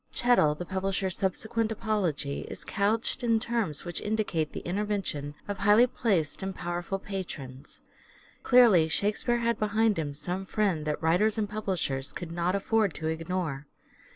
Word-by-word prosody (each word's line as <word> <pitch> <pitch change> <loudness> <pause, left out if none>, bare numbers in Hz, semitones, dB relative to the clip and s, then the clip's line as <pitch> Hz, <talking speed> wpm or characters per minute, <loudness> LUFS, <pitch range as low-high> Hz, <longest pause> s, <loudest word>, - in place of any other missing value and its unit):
Chettle 240 -12 +3
the 175 - -6
publisher's 190 0 -1
subsequent 220 +4 0
apology 190 -11 -1
is - - -8
couched 215 +4 0
in 230 -2 +3
terms 220 -11 -1
which 175 -1 -5
indicate 210 -8 -1
the - - -6
intervention 185 -7 -2
of 205 -1 -4
highly 210 +4 +6
placed 195 -12 0
and 190 0 -4
powerful 175 +2 -3
patrons. 155 -9 -7 0.6
Clearly 230 -10 +6
Shakspere 210 +7 +1
had 235 -1 0
behind 215 -1 +2
him 145 -3 -3
some 185 +5 -4
friend 185 -8 0
that 150 +1 -2
writers 190 +7 +3
and 215 -1 0
publishers 185 -10 -2
could 175 -2 -6
not 175 +2 0
afford 215 -2 +1
to 160 -1 -2
ignore. 160 -3 -3
190 Hz, 150 wpm, -28 LUFS, 160-215 Hz, 0.6 s, highly